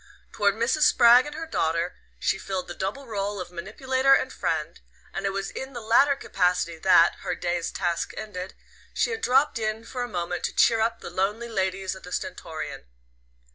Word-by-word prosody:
Toward 200 -1 +2
Mrs. 235 +7 0
Spragg 245 -1 +7
and 295 - -7
her 325 +1 -5
daughter 170 - -1 0.2
she - - 0
filled 190 -2 -4
the - - -6
double 205 +9 -4
role 205 -3 -3
of 180 -1 -6
manipulator 260 +9 +2
and - - -1
friend; - - -2 0.3
and - - -2
it - - 0
was 195 0 -3
in 265 0 -7
the 240 - -5
latter 235 +6 +4
capacity 180 -8 0
that, 175 -1 +5
her - - -3
day's 175 -1 -2
task 175 -2 -1
ended, 185 -3 -6 0.4
she - - +1
had 450 0 -3
dropped 265 0 +3
in 215 0 -2
for 250 +1 -5
a 245 - -2
moment 175 -4 -3
to - - -4
"cheer 225 -1 +4
up" 230 +1 0
the - - -7
lonely 205 +6 -1
ladies 190 -2 -1
of 190 - -11
the 180 - -11
Stentorian. 160 - -5
205 Hz, 190 wpm, -26 LUFS, 180-245 Hz, 0.4 s, Spragg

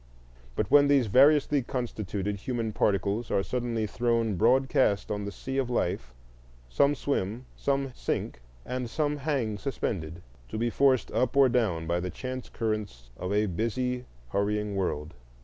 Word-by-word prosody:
But - - -1
when 145 0 +7
these 140 -3 +4
variously 140 +5 +5
constituted 105 -5 -3
human 115 0 -3
particles 105 +2 0
are 95 - +1
suddenly 120 -2 -1
thrown 115 -1 0
broadcast 120 -1 +3
on 105 -1 -2
the 100 - -4
sea 135 +7 -4
of 130 -2 -1
life, 60 - -1 0.5
some 140 - +3
swim, 125 -4 -2
some 135 -1 -1
sink, - - -3 0.2
and 125 -1 -3
some 150 +2 0
hang 130 -8 -1
suspended, 85 - -3 0.3
to - - -4
be 120 +1 0
forced 135 -1 +3
up 130 +2 0
or 135 -2 +7
down 105 -10 +1
by 85 +1 0
the 90 +1 -3
chance 130 +7 -6
currents 105 - -3
of 90 +8 -4
a 105 +1 +2
busy 125 +6 -2 0.3
hurrying 105 0 0
world. 80 -5 -2
115 Hz, 150 wpm, -28 LUFS, 100-130 Hz, 0.5 s, when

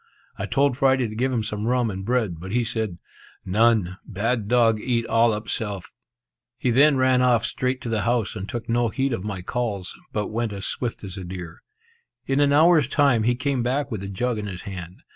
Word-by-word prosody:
I - - -4
told 140 -2 +2
Friday 135 -3 +3
to 110 - -8
give 130 +4 0
him 115 -4 0
some 105 0 -3
rum 125 -2 +1
and 95 0 -5
bread; 110 -7 0
but 95 +3 -7
he 120 +2 +2
said, 110 -6 -3 0.5
"None! 105 -2 +2
Bad 110 +1 -2
dog 115 -2 +3
eat 115 0 0
all 115 0 +3
up 105 0 -4
self." 100 -5 -4 0.7
He 125 - 0
then 140 +3 +5
ran 130 -1 +3
off 120 -2 +3
straight 130 +2 -1
to 120 - -5
the 110 -2 0
house, 120 -3 0
and 100 -1 -5
took 120 -2 -5
no 120 0 +1
heed 135 +3 -1
of 95 - -3
my 100 -4 -5
calls, 105 -4 -3 0.2
but 105 -1 -2
went 115 -1 -2
as 100 -1 -5
swift 120 -3 -3
as 95 -1 -6
a - - -6
deer. 90 -2 -7 0.7
In 135 +1 +1
an 145 -1 +4
hour's 155 -1 +5
time, 140 -5 +3
he 120 +3 +2
came 130 0 -1
back 135 +4 -1
with 110 -4 -3
a 100 - -5
jug 115 +3 -1
in 105 - -4
his 95 -2 -6
hand. 90 -2 -8
115 Hz, 220 wpm, -24 LUFS, 105-125 Hz, 0.7 s, then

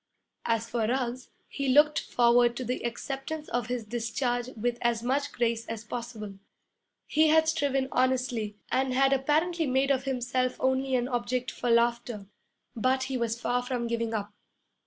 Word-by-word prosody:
As 230 0 +1
for 230 -2 -1
Ruggs, 250 0 -2 0.2
he 275 -1 -3
looked 295 +3 +5
forward 240 0 +3
to 255 - -3
the 250 +1 -3
acceptance 270 +6 -4
of 240 -2 -1
his 245 -2 -3
discharge 240 +2 -2
with 240 +2 -1
as 235 -1 +1
much 280 +3 0
grace 230 -1 0
as 225 -1 -5
possible. 220 -4 -6 0.7
He 315 +1 +3
had 315 +1 +4
striven 280 -4 +1
honestly, 250 -5 0
and 260 -1 +1
had 270 +1 +4
apparently 315 +5 +1
made 265 +2 +2
of 265 -1 +1
himself 255 -1 -1
only 260 0 +1
an 245 -1 +1
object 250 0 -2
for 245 - -3
laughter, 235 -2 +1 0.5
but 255 +3 +1
he 265 0 -3
was 235 -1 -1
far 245 +1 0
from 245 -1 -3
giving 230 -1 -1
up. 205 -2 -3
245 Hz, 160 wpm, -28 LUFS, 235-265 Hz, 0.7 s, looked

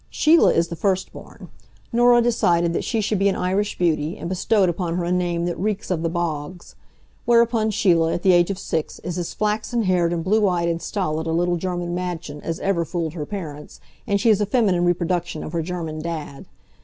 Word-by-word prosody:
Sheila 320 +2 +4
is 165 0 +1
the 170 - -5
first 190 +1 -1
born. - - -12 0.4
Norah 240 0 +5
decided 175 -8 +2
that - - -1
she 225 -3 -1
should 210 -1 0
be 200 0 +3
an 195 - -1
Irish 195 +3 -1
beauty, 165 +1 0
and 170 - -6
bestowed 190 +2 +2
upon 170 -1 -2
her 175 - -1
a 175 - -2
name 175 -1 0
that 175 - -3
reeks 205 0 -2
of 170 -3 0
the 165 - 0
bogs. 170 0 -4 0.5
Whereupon 235 -2 +3
Sheila, 170 -6 +2
at 175 - -3
the 190 - +5
age 175 0 +4
of 195 - -2
six, 160 -4 -3
is 180 0 -4
as 175 - -5
flaxen 215 +2 -1
haired 180 -3 +2
and 170 -1 -2
blue 210 +3 +2
eyed 170 -2 0
and 165 0 -2
stolid 160 -5 -2
a - - -1
little 175 +2 +1
German 175 0 -3
madchen 175 -5 -5
as 165 -1 -4
ever 190 -4 +1
fooled 165 -2 -3
her 150 -4 -5
parents, 155 -8 -7 0.3
and 200 -2 +1
she 225 +3 +4
is 210 -1 +2
a 205 - +1
feminine 195 -6 +2
reproduction 175 -1 -1
of 155 - -7
her 170 - 0
German 160 -2 -5
Dad. 155 -4 -6
175 Hz, 215 wpm, -22 LUFS, 170-200 Hz, 0.5 s, Norah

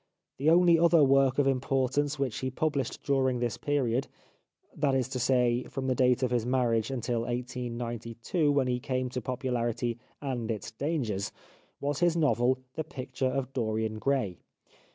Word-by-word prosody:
The 145 +3 +3
only 170 0 +6
other 170 -2 +5
work 135 -1 +4
of 145 - +3
importance 135 +2 +1
which 135 -5 -2
he 130 - -2
published 140 -1 -2
during 130 -2 +1
this 120 -1 -1
period 135 -3 0 0.4
— - - -35
that 140 -3 +1
is 130 -2 +1
to 130 -1 -3
say, 125 -1 +2
from 135 - -5
the 130 - +2
date 125 0 +3
of 125 - +1
his 120 -2 +1
marriage 120 -3 +1
until 120 -2 -1
1892, 120 - -2
when 140 -2 +2
he 125 -1 0
came 130 0 -2
to 125 0 -4
popularity 120 -2 -2 0.2
and 125 -5 -3
its 110 -1 -4
dangers 115 -7 -2 0.2
— - - -34
was 145 0 -2
his 175 -1 +3
novel 130 -5 +3
" 125 - -47
The 160 - 0
Picture 130 -3 -3
of 135 0 -3
Dorian 110 -3 -1
Gray." 125 -9 0
130 Hz, 175 wpm, -29 LUFS, 120-140 Hz, 0.4 s, only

